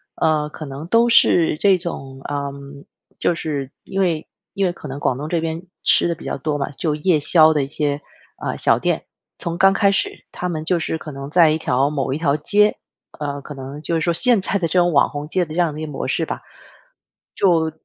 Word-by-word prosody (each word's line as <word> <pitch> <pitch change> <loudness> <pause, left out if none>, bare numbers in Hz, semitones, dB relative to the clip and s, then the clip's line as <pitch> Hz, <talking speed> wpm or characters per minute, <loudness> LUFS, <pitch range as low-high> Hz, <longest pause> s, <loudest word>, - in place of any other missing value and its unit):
呃， 155 -2 +1
可 155 - -8
能 140 +3 -7
都 230 +5 +4
是 165 -8 +4
这 195 +1 +4
种 135 -6 -6
嗯， 140 0 -6 0.3
就 175 - +2
是， 145 -5 -3
因 195 - -4
为 170 -5 0 0.3
因 195 - 0
为 180 - +1
可 165 - -10
能 135 0 -6
广 130 -3 0
东 145 +3 -5
这 170 -1 0
边 165 0 -3 0.2
吃 - - +4
的 170 - -1
比 - - -13
较 - - -3
多 145 +2 -2
嘛， 140 0 -3
就 150 +2 -2
夜 155 +1 +2
宵 155 +1 +5
的 150 -2 +1
一 - - -4
些， 145 0 -2 0.4
呃， - - -2
小 - - +3
店。 - - 0 0.4
从 170 0 -3
刚 195 +2 +5
开 200 0 +3
始， 195 - -2
它 180 - -4
们 155 -3 -3
就 175 0 +1
是 160 - -2
可 155 - -8
能 140 0 -7
在 165 0 +5
一 155 - +1
条 135 -2 +1
某 135 -3 -1
一 - - -1
条 150 -2 +1
街， 210 +7 +2 0.4
呃， 145 -1 -3
可 145 - -9
能 135 +2 -8
就 170 - -2
是 165 - 0
说 170 +2 +1
现 235 +4 +3
在 - - -4
的 175 -4 0
这 180 - +3
种 175 -1 +3
网 140 - +4
红 145 0 -6
街 180 +3 +1
的 155 - -9
这 170 - -2
样 170 -3 +2
的 155 - -7
一 - - -3
个 150 - -7
模 135 - -4
式 - - 0
吧， - - -5 0.9
就 165 -4 +3
155 Hz, 255 characters per minute, -21 LUFS, 145-175 Hz, 0.9 s, 宵